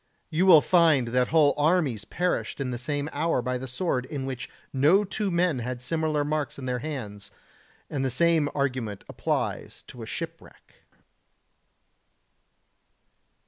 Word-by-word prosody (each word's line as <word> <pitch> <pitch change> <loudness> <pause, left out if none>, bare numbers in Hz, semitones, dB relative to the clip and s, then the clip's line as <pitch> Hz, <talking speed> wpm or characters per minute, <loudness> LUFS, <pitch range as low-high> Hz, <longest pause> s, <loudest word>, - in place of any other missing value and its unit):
You 170 +4 +2
will 165 -5 +9
find 160 -9 +4
that 125 +1 +2
whole 155 -3 +4
armies 145 - +1
perished 180 -4 -2
in 130 -2 -2
the 120 - -4
same 145 +3 -2
hour 160 0 +1
by 125 +1 -2
the 130 - -6
sword 130 -1 -2
in 140 -2 -4
which 125 -2 -5 0.2
no 150 +10 +4
two 205 +1 -2
men 170 -5 +1
had 125 +1 -4
similar 155 +2 0
marks 150 -1 -2
in 135 - -7
their 125 -1 -1
hands, 115 -9 -6 0.6
and 140 -3 -3
the 135 - +1
same 165 +1 +3
argument 125 -8 -2
applies - - -3
to - - -12
a - - -7
shipwreck. - - -9
145 Hz, 145 wpm, -26 LUFS, 125-160 Hz, 0.6 s, will